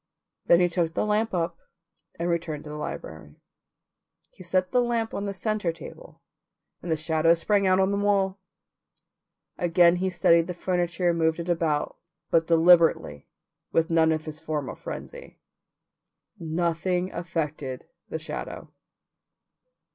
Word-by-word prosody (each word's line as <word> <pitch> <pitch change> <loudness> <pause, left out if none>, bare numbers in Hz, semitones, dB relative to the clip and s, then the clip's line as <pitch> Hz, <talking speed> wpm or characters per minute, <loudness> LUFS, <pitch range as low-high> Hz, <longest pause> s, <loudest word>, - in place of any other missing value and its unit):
Then 170 - +6
he 175 - +4
took 170 -2 -1
the - - 0
lamp 215 +2 +1
up 170 -2 -2 0.6
and 170 - -2
returned 165 -3 -2
to 150 - -9
the - - -6
library. 80 - -7 1.0
He - - -17
set 185 +1 0
the 250 - +3
lamp 235 -2 -1
on 200 - -3
the 200 - -2
centre 210 -2 -1
table, - - -12 0.6
and 175 - -5
the - - +3
shadow 160 +1 +2
sprang 200 +3 +1
out 185 0 +4
on 190 +1 +2
the 200 0 -1
wall. 195 -1 +1 1.2
Again 175 0 +4
he 190 +1 0
studied 170 -2 +3
the 180 - -5
furniture 175 0 0
and 170 - -2
moved 160 0 +1
it 170 +1 -5
about, 165 -3 0 0.3
but 165 0 +3
deliberately, 165 - +4 0.4
with 165 +1 +1
none 160 -1 +4
of 155 0 -2
his 155 -1 -6
former 155 -4 -4
frenzy. - - -9 1.0
Nothing 175 +2 -1
affected 155 -6 -4 0.2
the - - -3
shadow. - - -7
170 Hz, 145 wpm, -26 LUFS, 160-185 Hz, 1.2 s, Then